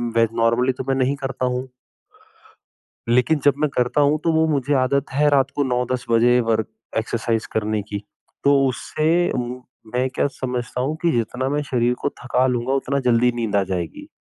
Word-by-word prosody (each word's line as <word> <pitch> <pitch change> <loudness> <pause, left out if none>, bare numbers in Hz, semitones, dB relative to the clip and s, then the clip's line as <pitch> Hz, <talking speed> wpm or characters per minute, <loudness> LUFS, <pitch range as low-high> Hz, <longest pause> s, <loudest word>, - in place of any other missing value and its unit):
वे 115 0 +4
normally 115 +3 +2
तो 130 - -6
मैं 135 - +2
नहीं 135 +2 +1
करता 135 -2 -3
हूँ। 125 +1 -2 1.4
लेकिन 125 +6 +3
जब 145 - +6
मैं 150 - +2
करता 125 +2 +1
हूँ 145 +2 +3
तो 165 - +2
वो 160 0 +3
मुझे 145 -2 0
आदत 140 +1 0
है 145 +2 +3
रात 140 -1 +2
को 145 - +1
9-10 125 -1 -1
बजे 120 +2 +4
वर 110 -1 +2 0.3
एक्सरसाइज़ 115 0 -1
करने 110 -1 0
की। 100 0 -4 0.4
तो 140 0 +5
उससे 160 +7 0 0.6
मैं 130 +1 +1
क्या - - +2
समझता 125 -1 -4
हूँ 150 +4 -1
कि 170 -1 +2
जितना 125 +3 -1
मैं 145 +1 0
शरीर 125 -3 +1
को - - 0
थका 125 0 +2
लूँगा, 125 +1 -1
उतना 140 +1 0
जल्दी 125 -1 +3
नींद 115 -4 -2
आ 100 - +3
जाएगी, 90 -4 -5
125 Hz, 180 wpm, -21 LUFS, 120-140 Hz, 1.4 s, जब